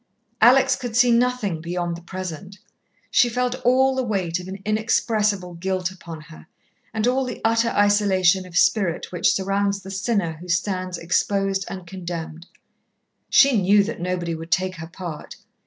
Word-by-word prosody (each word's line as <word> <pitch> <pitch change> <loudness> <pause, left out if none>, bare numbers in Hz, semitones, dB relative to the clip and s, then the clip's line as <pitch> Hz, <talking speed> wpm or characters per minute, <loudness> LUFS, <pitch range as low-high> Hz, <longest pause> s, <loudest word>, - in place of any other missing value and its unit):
Alex 260 +1 +6
could 245 -3 -6
see 245 -1 +5
nothing 235 -8 +1
beyond 175 0 -3
the 170 - -10
present. 185 +1 -7 0.5
She 245 - +4
felt 250 +2 -2
all 260 +2 +4
the 260 - -1
weight 190 -8 -1
of 180 - -9
an 190 +1 -6
inexpressible 215 -3 0
guilt 185 +1 -2
upon 170 -4 -10
her, 160 0 -14 0.4
and 220 -1 -1
all 255 +2 +2
the 250 - -5
utter 230 +1 +2
isolation 195 -3 +2
of 180 0 -5
spirit 185 -4 +1
which 175 -1 +2
surrounds 200 +1 0
the 195 - -8
sinner 195 -5 -1
who 180 - -10
stands 185 +1 -1
exposed 195 +3 0
and 185 -1 -7
condemned. 170 -2 -7 0.8
She 270 -7 +5
knew 200 +2 +4
that 200 - -5
nobody 175 -1 -2
would 165 +1 -7
take 185 +1 0
her 165 0 -7
part. 170 -3 -8
190 Hz, 160 wpm, -22 LUFS, 175-220 Hz, 0.8 s, Alex